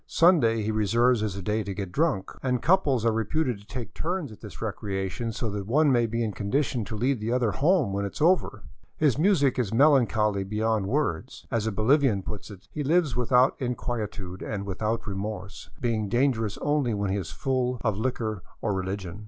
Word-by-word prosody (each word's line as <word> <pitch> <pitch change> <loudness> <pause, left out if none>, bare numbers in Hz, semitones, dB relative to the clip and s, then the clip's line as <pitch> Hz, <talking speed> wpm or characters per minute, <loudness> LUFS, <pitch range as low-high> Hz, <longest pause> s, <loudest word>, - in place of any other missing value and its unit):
Sunday 125 - +4
he 110 - -1
reserves 115 +3 +2
as 105 -3 -2
a 100 - -6
day 105 +3 0
to 100 -1 -5
get 100 -3 -5
drunk, 145 - 0
and 125 -2 0
couples 145 - +2
are 115 - +4
reputed 120 +2 -1
to 100 - -19
take 120 -4 -6
turns 170 -5 -3
at 105 - -13
this 105 -3 -10
recreation, 100 +1 -3
so 115 +1 -3
that 100 -1 -4
one 145 +5 +4
may 120 -2 +3
be 115 +1 -1
in 110 - -1
condition 120 +4 -1
to 110 - -6
lead 125 +3 0
the 110 +2 -2
other 120 -3 +2
home 145 - +2
when 100 0 -1
it 100 - -4
is - - -9
ove;r. 175 +4 +2 0.3
His 145 -4 +2
music 155 -8 +3
is 110 -5 0
melancholy 115 -6 +3
beyond 105 0 0
words. 140 +1 -2
As 115 -3 0
a - - 0
Bolivian 110 -1 +2
puts 105 +2 -7
it, 100 -2 -12
" - - -46
He 150 - -2
lives 155 -3 +2
without 125 +2 +3
inquietude 110 -7 -4
and 100 -2 -4
without 110 +4 -2
remorse, 100 -1 -5
being 110 -4 -1
dangerous 120 -4 +1
only 145 -6 +1
when 100 -1 -1
he 100 - 0
is 90 -4 -4
full 130 -3 -1
or 110 - +2
liquor 110 -1 -2 0.2
or 105 - -1
religion. 95 0 -4
115 Hz, 200 wpm, -26 LUFS, 100-130 Hz, 0.3 s, Sunday